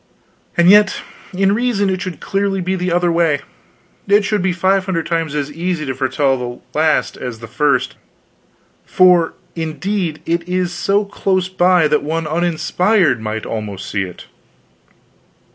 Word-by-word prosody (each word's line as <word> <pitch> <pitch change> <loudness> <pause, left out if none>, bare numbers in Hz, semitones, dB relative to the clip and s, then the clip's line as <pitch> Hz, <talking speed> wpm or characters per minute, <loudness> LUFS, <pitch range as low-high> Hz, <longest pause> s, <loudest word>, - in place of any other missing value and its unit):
"And 170 0 +4
yet 205 +1 +5 0.3
in 195 +1 +2
reason 215 -4 +1
it 185 0 -2
should 185 -3 -5
clearly 195 0 -1
be 185 +1 -1
the 180 -1 -2
other 175 0 +2
way; 165 -4 +1 0.7
it 200 +1 +4
should 210 -1 0
be 185 0 +1
five 185 +2 +1
hundred 170 -4 -1
times 165 -3 -2
as 145 0 -2
easy 165 0 -3
to 135 - -2
foretell 135 +1 0
the 120 -1 -6 0.2
last 155 0 +1
as 125 -3 -6
the 115 - -9
first, 130 +3 0 0.9
for, 180 -3 +4 0.2
indeed, 165 +1 -3
it 170 +1 -2
is 180 -1 -1
so 200 +4 +1
close 190 -2 -1
by 180 -3 +3
that 150 0 +2
one 160 +2 -2
uninspired 175 - +1
might 110 0 -4
almost 105 -3 -5
see 100 - -1
it. 90 -2 -7
170 Hz, 155 wpm, -17 LUFS, 150-185 Hz, 0.9 s, yet